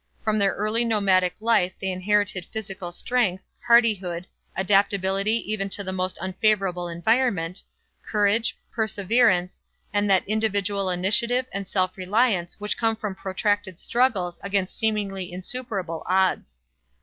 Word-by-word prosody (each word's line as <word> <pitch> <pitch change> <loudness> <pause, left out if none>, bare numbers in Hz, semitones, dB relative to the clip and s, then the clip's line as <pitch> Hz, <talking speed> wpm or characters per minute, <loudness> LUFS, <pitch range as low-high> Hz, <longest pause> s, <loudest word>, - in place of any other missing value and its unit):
From 215 0 +1
their 200 -1 +2
early 215 +3 +1
nomadic 190 -5 +2
life 220 -5 +2
they 190 - -2
inherited 185 -1 0
physical 195 -5 -6
strength, 190 -1 0 0.2
hardihood, 200 -7 +3 0.3
adaptability 195 +2 +1
even 195 -2 -1
to 200 - -2
the 190 -1 -4
most 185 0 -2
unfavorable 190 -1 0
environment, 180 0 0 0.4
courage, 215 +2 +1 0.2
perseverance 210 -3 +1 0.3
and 205 0 +1
that 190 -1 +3
individual 205 -2 0
initiative 215 +8 +2
and 200 -1 -4
self 185 -2 0
reliance 190 -2 +1
which 210 0 -3
come 225 -1 +2
from 210 -3 -4
protracted 190 0 -2
struggles 225 -8 0
against 195 -1 -1
seemingly 200 -4 -2
insuperable 185 -3 -4
odds. 185 - +1
195 Hz, 125 wpm, -24 LUFS, 185-215 Hz, 0.4 s, hardihood